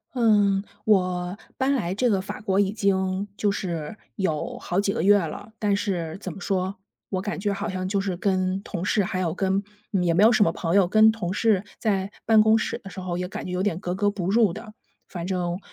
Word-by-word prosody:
嗯， 205 -4 +3 0.2
我 180 -2 +1 0.2
搬 265 +1 +1
来 185 -8 -1
这 245 +4 +1
个 195 - +2
法 190 - -6
国 195 -2 +1
已 195 -1 +2
经 195 -1 0
就 205 - +1
是 175 -2 -4 0.2
有 190 +5 -2
好 195 -5 -1
几 200 - 0
个 165 - -2
月 205 +2 +6
了， 200 +5 -6
但 205 -2 +2
是 175 -6 -2
怎 185 -4 -6
么 195 - -10
说， 190 -1 -1 0.3
我 185 -2 -1
感 205 +1 -4
觉 205 +1 0
好 200 +2 -3
像 185 0 -3
就 195 +1 0
是 190 -3 -3
跟 185 0 0
同 180 -5 -5
事 205 +2 +2
还 185 0 -2
有 170 -3 -1
跟 195 +1 0 0.3
也 180 -4 +1
没 190 - +5
有 225 - +7
什 215 - +3
么 165 - +2
朋 165 0 -2
友， 195 -3 +5
跟 215 +3 +6
同 210 -6 -4
事 210 -1 +2
在 200 -3 -1
办 220 -1 +6
公 220 +1 +5
室 - - -2
的 195 - -10
时 190 - -8
候 180 -1 -3
也 180 - -2
感 185 - -6
觉 180 - -5
有 180 0 -1
点 190 -4 0
格 180 -1 -3
格 205 +2 +1
不 195 -3 -2
入 220 -3 +4
的， 215 +5 -9 0.3
反 175 -1 -6
正 180 -1 -2
195 Hz, 250 characters per minute, -25 LUFS, 180-205 Hz, 0.3 s, 有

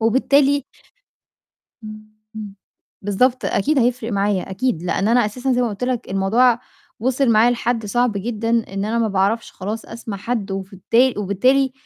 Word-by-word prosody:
وبالتالي 275 +4 +3 1.2
امم، 215 0 -10 0.3
امم، 210 -2 -7 0.5
بالضبط، 240 +6 +1
أكيد 290 +9 +1
هيفرق 240 -2 0
معايا، 200 -2 0
أكيد، 195 -2 -1
لإن 190 +3 0
أنا 240 +1 +4
أساسًا 250 +5 -2
زي 250 0 +2
ما 240 - +1
قُلت 210 +3 -4
لك 250 -5 -3
الموضوع 225 +6 +3 0.4
وصل 260 +3 +1
معايا 225 +2 +5
لحد 235 -2 -1
صعب 240 +3 +1
جدًا 225 +2 -3
إن 210 -4 -1
أنا 225 +2 -1
ما 230 -1 +1
باعرفش 200 +3 0
خلاص 210 +4 -5
أسمع 225 -2 -7
حد 220 0 -3
وفالتال 195 +6 0
وبالتالي 255 +7 +2
225 Hz, 150 wpm, -20 LUFS, 200-250 Hz, 1.2 s, معايا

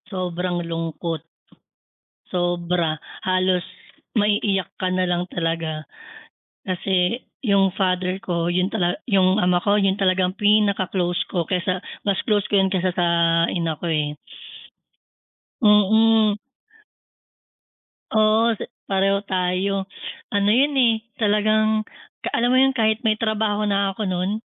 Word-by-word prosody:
Sobrang 180 -2 -3
lungkot. 165 -1 -4 1.1
Sobra, 175 -3 -1 0.3
halos 185 -1 +1 0.5
maiiyak 205 -3 +1
ka 185 -1 -1
na 185 0 +1
lang 175 0 0
talaga. 165 -3 -3 0.8
Kasi 185 +3 0 0.2
yung 195 -5 +2
father 185 0 -1
ko 170 -2 -2
yun 180 +2 0
tala 175 -1 0 0.2
yung 190 +1 +3
ama 180 0 +3
ko 200 +3 +1
yun 195 -1 +2
talagang 185 -1 +2
pinaka-close 200 -4 +2
ko 175 - -1
kesa 180 +1 -2 0.2
mas 195 -2 +1
close 210 -3 +1
ko - - -4
yun 190 - +1
kesa 185 -2 0
sa 175 -1 +1 0.4
ina 165 -2 -1
ko 170 - -1
eh. 150 -2 -1 1.5
Mm. 215 0 +4 1.8
Oo, 220 +1 +3 0.4
pareho 195 +1 +2
tayo, 190 +1 -1 0.5
ano 200 0 +2
yun 275 +5 +3
eh, 235 -4 +3 0.2
talagang 215 0 +1 0.5
alam 240 +1 +2
mo 255 - +4
yun 270 0 +3
kahit 220 -2 +2
may 215 - +3
trabaho 215 -1 -1
na 200 -2 0
ako 215 - -3
nun, 190 +3 -2
190 Hz, 120 wpm, -22 LUFS, 180-210 Hz, 1.8 s, Mm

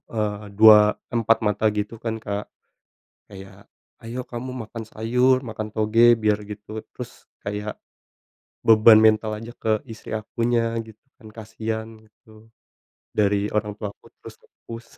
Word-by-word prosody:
eee, 105 -1 -2
dua 105 -1 +8 0.2
empat 115 -1 +2
mata 105 +1 0
gitu 105 +2 -4
kan, 115 -1 -3
Kak. 100 0 -4 0.8
Kayak, 95 -1 -13 0.4
ayo 120 +2 -5
kamu 125 +2 -6 0.2
makan 115 -1 -7
sayur, 125 +4 +2
makan 110 -1 -5
toge 115 +2 +4
biar 105 -1 +2
gitu, 105 +1 -8
terus - - -10 0.2
kayak 105 +1 -4 0.9
beban 110 0 +7
mental 110 0 +3
aja 115 +1 -9
ke 110 -1 +2
istri 110 - -10
akunya 115 +1 -1
gitu 110 -1 -16 0.2
kan, 110 -5 -15
kasian 110 0 -5 0.2
gitu. 110 +1 -21 0.7
Dari 100 0 +2
orang 105 -1 -1
tua 105 -2 -4
aku - - -22
terus - - -11
nge-push. 115 0 -12
110 Hz, 135 wpm, -23 LUFS, 105-115 Hz, 0.9 s, dua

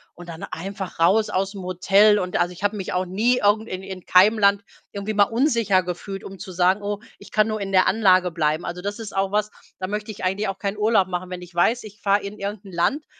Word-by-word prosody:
Und 175 0 -12
dann 165 -1 -8
einfach 190 0 -6
raus 210 +6 +3
aus 195 0 -1
dem 195 -3 -8
Hotel 195 +4 +4
und 180 0 -4
also, 175 - +1
ich 175 - -12
habe 205 - +1
mich 195 -3 -5
auch 185 0 0
nie 225 +7 +1
irgend 215 +1 +2
in 185 +1 -5
in 190 -2 -8
keinem 205 +5 +5
Land 200 0 +3 0.3
irgendwie 200 +2 -4
mal 205 0 +5
unsicher 230 -7 +2
gefühlt, 185 +2 -6
um 195 -1 -9
zu 195 -2 -8
sagen: 185 +3 +2
„Oh, 205 0 -3 0.2
ich - - -14
kann 215 0 +3
nur 215 -1 -3
in 195 0 -4
der 185 -1 +4
Anlage 185 -4 +3
bleiben.“ 155 0 0
Also, 175 +1 -5
das 205 +3 -4
ist 210 -3 -8
auch 195 0 0
was, 210 0 0 0.3
da 185 - -3
möchte 210 +1 -4
ich 200 - -6
eigentlich 195 +2 -1
auch 195 - -5
keinen 200 0 -3
Urlaub 210 -3 +3
machen. 180 0 -4
Wenn 180 -1 -6
ich 175 -1 -13
weiß, 225 +7 +2
ich 210 +1 -13
fahre 200 0 +2
in 200 +1 -7
irgendein 200 -1 -6
Land, 270 - 0
195 Hz, 250 wpm, -23 LUFS, 185-210 Hz, 0.3 s, keinem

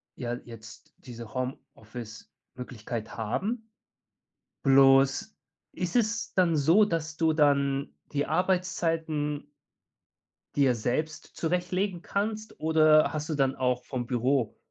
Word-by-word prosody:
ja 120 -1 -4
jetzt 115 -2 -11
diese 115 -3 -10
Homeoffice-Möglichkeit 120 -2 -7
haben, 210 - -3 0.9
bloß, 135 +6 +5 0.4
ist 180 +2 -4
es 225 -1 0
dann 175 -3 +3
so, 165 +9 +5
dass 160 -4 -3
du 160 -1 +2
dann 140 -2 +2 0.2
die 145 0 0
Arbeitszeiten 165 -4 -1 1.1
dir 135 -3 +4
selbst 140 +8 -3
zurechtlegen 180 +2 -1
kannst, 215 +3 -3
oder 155 0 +4
hast 155 +1 -4
du 155 - -1
dann 135 -1 +1
auch 125 -1 0
vom 125 -3 -4
Büro, 125 -1 0
150 Hz, 105 wpm, -28 LUFS, 125-170 Hz, 1.1 s, bloß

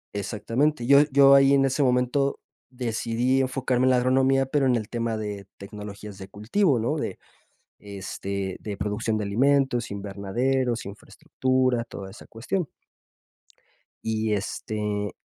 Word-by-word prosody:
Exactamente, 115 +7 -1
yo 140 +3 +7
yo 140 0 +6
ahí 135 0 +6
en 135 0 +4
ese 135 +2 0
momento 125 +2 +1 0.3
decidí 120 +1 0
enfocarme 130 -1 0
en - - +5
la 130 - +4
agronomía, 135 +2 +3
pero 135 0 +1
en 125 - +3
el 110 -2 -2
tema 115 -2 -2
de 105 -2 -5
tecnologías 105 0 -9
de 95 - -8
cultivo, 120 - +1
¿no? 120 +8 -1
De, - - -4 0.6
este, 100 -1 -5
de 105 -2 -6
producción 105 +2 -1
de 105 - -2
alimentos, 125 +3 +1
invernaderos, 115 +6 -2
infraestructura, 130 +4 -1
toda 95 -4 -9
esa 105 - -14
cuestión. 155 +8 -3 1.4
Y, 110 -1 0
este, 105 0 -3
120 Hz, 135 wpm, -25 LUFS, 105-135 Hz, 1.4 s, yo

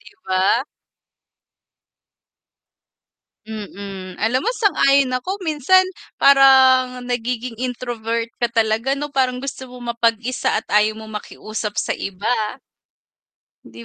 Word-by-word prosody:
'Di - - -17
ba? 190 +7 +2 2.8
Mm. 200 -3 -8
Alam 245 - +1
mo 465 - +2
sang-ayon 280 - +3
ako 380 +10 -4
minsan 320 +2 +3 0.4
parang 260 -2 +6
nagiging 245 -1 -3
introvert 235 -2 -3
ka 240 -1 -1
talaga, 225 +3 +1
'no, 295 +1 -3
parang 255 -2 0
gusto 270 -1 -6
mo 250 -1 -12
mapag-isa 230 0 0
at - - -25
ayaw 210 +1 +3
mong 220 -1 -7
makiusap 215 -1 -6
sa - - -2
iba. 195 +1 -4 1.4
'Di 115 +1 -12
245 Hz, 110 wpm, -20 LUFS, 220-265 Hz, 2.8 s, parang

